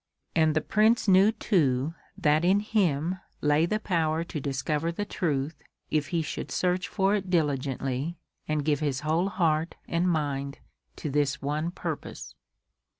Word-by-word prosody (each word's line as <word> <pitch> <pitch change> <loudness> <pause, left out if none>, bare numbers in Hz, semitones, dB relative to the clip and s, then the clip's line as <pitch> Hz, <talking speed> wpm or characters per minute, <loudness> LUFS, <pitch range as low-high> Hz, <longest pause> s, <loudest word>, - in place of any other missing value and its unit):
And 160 -1 +3
the 155 - +3
Prince 220 +5 +3
knew 195 +2 +6
too 155 - +1 0.2
that 150 +2 +3
in 190 +3 +4
him 185 -5 0 0.2
lay 150 +3 +3
the 215 +4 0
power 165 -5 0
to 170 -2 -5
discover 145 +4 -1
the 205 +5 -3
truth 150 -6 -2 0.3
if 150 -2 +1
he 170 -3 0
should - - -5
search 180 0 0
for 195 0 +1
it 195 -3 -1
diligently 140 -1 -1 0.3
and 150 -2 -1
give 150 -2 +2
his 145 -3 -1
whole 160 +5 +1
heart 165 -4 +1
and 170 +2 +1
mind 140 -4 -1 0.4
to 150 - -4
this 145 0 +1
one 150 +4 -1
purpose. 175 - -6
155 Hz, 150 wpm, -27 LUFS, 145-180 Hz, 0.4 s, knew